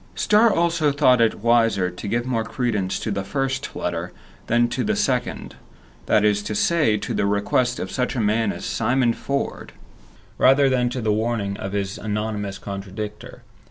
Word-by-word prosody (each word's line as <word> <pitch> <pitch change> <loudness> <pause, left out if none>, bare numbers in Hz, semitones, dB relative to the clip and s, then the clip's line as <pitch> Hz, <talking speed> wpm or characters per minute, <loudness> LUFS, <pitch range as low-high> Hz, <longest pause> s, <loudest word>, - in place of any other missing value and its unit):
Starr 215 +2 +4
also 165 -4 +2
thought 130 -4 +4
it 110 -2 +1
wiser 115 -6 +3
to 90 +3 -8
give 120 +3 -1
more 120 -3 -1
credence 110 -5 -2
to 110 - -3
the 100 -1 -2
first 135 +5 -3
letter - - -3 0.4
than 120 +1 +3
to 120 - -2
the 215 +1 0
second; 135 -12 -2 0.5
that 105 - +3
is 105 -1 +2
to 105 +1 -4
say, 150 -4 +2
to - - -4
the 100 - 0
request 120 +5 +1
of - - -4
such 125 0 -1
a - - -1
man 110 0 +1
as - - -7
Simon 125 -2 +1
Ford, 140 +3 -4 0.7
rather 135 +1 +5
than 125 -2 +1
to 125 0 -4
the 110 -1 +1
warning 110 -2 -1
of 95 +1 -6
his 100 -1 -3
anonymous 105 -1 -3
contradictor. 100 +2 -7
115 Hz, 175 wpm, -22 LUFS, 105-130 Hz, 0.7 s, rather